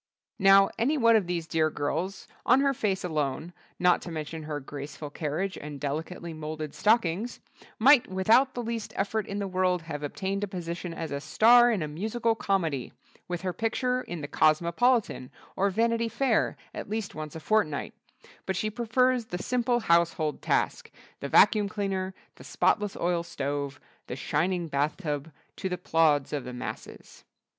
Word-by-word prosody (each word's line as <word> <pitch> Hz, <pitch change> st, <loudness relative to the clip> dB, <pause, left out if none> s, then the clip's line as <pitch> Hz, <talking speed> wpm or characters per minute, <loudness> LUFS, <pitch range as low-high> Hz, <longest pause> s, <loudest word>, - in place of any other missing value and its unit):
Now, 195 Hz, 0 st, +6 dB
any 280 Hz, +7 st, +2 dB
one 230 Hz, -3 st, +5 dB
of 205 Hz, -5 st, +2 dB
these 175 Hz, -2 st, -2 dB
dear 160 Hz, -1 st, +1 dB
girls, 160 Hz, +6 st, -3 dB, 0.2 s
on 255 Hz, +2 st, +5 dB
her 275 Hz, 0 st, +2 dB
face 200 Hz, -6 st, -1 dB
alone—not 165 Hz, +3 st, -1 dB
to -, -, -7 dB
mention 160 Hz, 0 st, -5 dB
her 150 Hz, -1 st, -4 dB
graceful 145 Hz, +1 st, -8 dB
carriage 165 Hz, +6 st, -3 dB
and 145 Hz, -1 st, -8 dB
delicately 160 Hz, +4 st, -4 dB
moulded 155 Hz, -1 st, -6 dB
stockings—might 230 Hz, -, +2 dB
without 220 Hz, +8 st, +3 dB
the 245 Hz, -, -3 dB
least 230 Hz, -1 st, -4 dB
effort 205 Hz, +1 st, -1 dB
in 200 Hz, -, -4 dB
the 200 Hz, -1 st, -2 dB
world 185 Hz, -2 st, 0 dB
have 155 Hz, -3 st, -6 dB
obtained 195 Hz, +6 st, -3 dB
a -, -, -1 dB
position 175 Hz, -2 st, -5 dB
as 165 Hz, -1 st, -5 dB
a 140 Hz, 0 st, -3 dB
Star 240 Hz, +10 st, +6 dB
in 210 Hz, -8 st, 0 dB
a -, -, -3 dB
Musical 220 Hz, +9 st, -1 dB
Comedy—with 175 Hz, -, -3 dB
her 185 Hz, -1 st, -1 dB
picture 250 Hz, +5 st, 0 dB
in 175 Hz, -9 st, -6 dB
the 145 Hz, -, -4 dB
Cosmopolitan 170 Hz, -, +2 dB, 0.3 s
or 200 Hz, +1 st, +2 dB
Vanity 230 Hz, +3 st, +1 dB
Fair 255 Hz, -2 st, +1 dB, 0.2 s
at -, -, -7 dB
least 215 Hz, -1 st, -3 dB
once 155 Hz, +1 st, -7 dB
a -, -, -5 dB
fortnight—but 190 Hz, +1 st, -3 dB
she 215 Hz, +4 st, -1 dB
prefers 240 Hz, +2 st, +1 dB
the 180 Hz, -, -5 dB
simple 240 Hz, +4 st, 0 dB
household 170 Hz, -4 st, +1 dB
task, -, -, 0 dB, 0.3 s
the 140 Hz, -, -5 dB
vacuum 210 Hz, +3 st, +5 dB
cleaner, 190 Hz, -2 st, -3 dB, 0.2 s
the -, -, -12 dB
spotless 205 Hz, -2 st, 0 dB
oil 175 Hz, 0 st, 0 dB
stove, 145 Hz, -4 st, -4 dB, 0.3 s
the 125 Hz, -, -4 dB
shining 170 Hz, +6 st, -1 dB
bathtub 150 Hz, +1 st, -2 dB, 0.3 s
to 190 Hz, -, -3 dB
the 180 Hz, -, -2 dB
plaudits 155 Hz, -5 st, +2 dB
of 145 Hz, -3 st, -2 dB
the 125 Hz, -, -7 dB
masses. 125 Hz, -, -8 dB
180 Hz, 160 wpm, -28 LUFS, 155-220 Hz, 0.3 s, Now